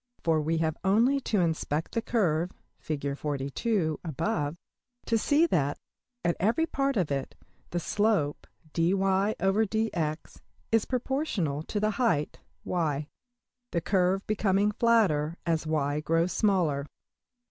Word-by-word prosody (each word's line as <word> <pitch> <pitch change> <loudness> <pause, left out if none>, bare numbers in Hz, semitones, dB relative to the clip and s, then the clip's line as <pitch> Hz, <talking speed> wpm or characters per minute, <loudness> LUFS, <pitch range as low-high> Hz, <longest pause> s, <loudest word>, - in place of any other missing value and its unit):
For 160 -2 +2
we 160 +2 0
have 160 0 0
only 230 +9 +3
to 205 -4 +3
inspect 160 -2 -1
the 230 - -1
curve, 180 -8 +1 0.3
\Fig 150 -2 -4
above, 155 - -1 0.5
to 230 - +1
see 295 +8 +4
that, 145 - +1 0.5
at 170 - +2
every 225 - +2
part 275 -4 0
of 175 -7 0
it, 135 -1 -3 0.3
the 175 - -1
slope~$\dfrac{dy}{dx}$ 195 +1 0 0.3
is 225 -1 +3
proportional 245 - -1
to 205 +6 -3
the 215 +1 +1
height~$y$; 160 - -1 0.6
the 170 - 0
curve 190 +1 +1
becoming 205 -1 +2
flatter 190 -9 +2
as 165 -2 0
$y$~grows 155 +3 +1
smaller. 165 -9 +1
175 Hz, 110 wpm, -28 LUFS, 155-215 Hz, 0.6 s, see